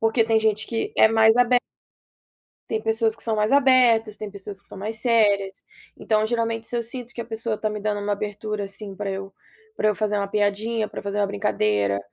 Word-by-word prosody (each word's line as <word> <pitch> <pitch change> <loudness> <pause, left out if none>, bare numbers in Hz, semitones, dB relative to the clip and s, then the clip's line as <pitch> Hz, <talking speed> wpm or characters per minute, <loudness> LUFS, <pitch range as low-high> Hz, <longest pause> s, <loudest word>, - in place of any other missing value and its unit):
Porque 225 +1 +3
tem 225 0 +3
gente 220 -1 0
que 225 -1 -3
é - - +7
mais 220 0 +5
abe 245 0 +4 1.1
tem 220 -1 -1
pessoas 225 0 +1
que 225 - -11
são 225 -2 -1
mais 215 +2 +1
abertas, 250 -6 +4
tem 215 -1 -6
pessoas 200 0 -8
que - - -13
são - - -10
mais 215 +3 -4
sérias. 205 -4 +1 0.3
Então, 215 -1 +1
geralmente, 230 -1 -2
se 240 - -2
eu 235 - 0
sinto 240 +1 -5
que - - -5
a - - -4
pessoa 225 -1 -3
tá 215 - -1
me 210 0 -5
dando 205 0 -1
uma 205 0 -1
abertura, 210 0 -4
assim, 195 0 -6
para 205 0 -3
eu 195 0 -6 0.4
para 215 - +2
eu 210 - +2
fazer 210 0 -1
uma 200 -1 -1
piadinha, 210 +2 0
para - - -7
eu - - -15
fazer 200 +1 -3
uma 205 - +2
brincadeira. 105 - 0
215 Hz, 225 wpm, -23 LUFS, 205-225 Hz, 1.1 s, é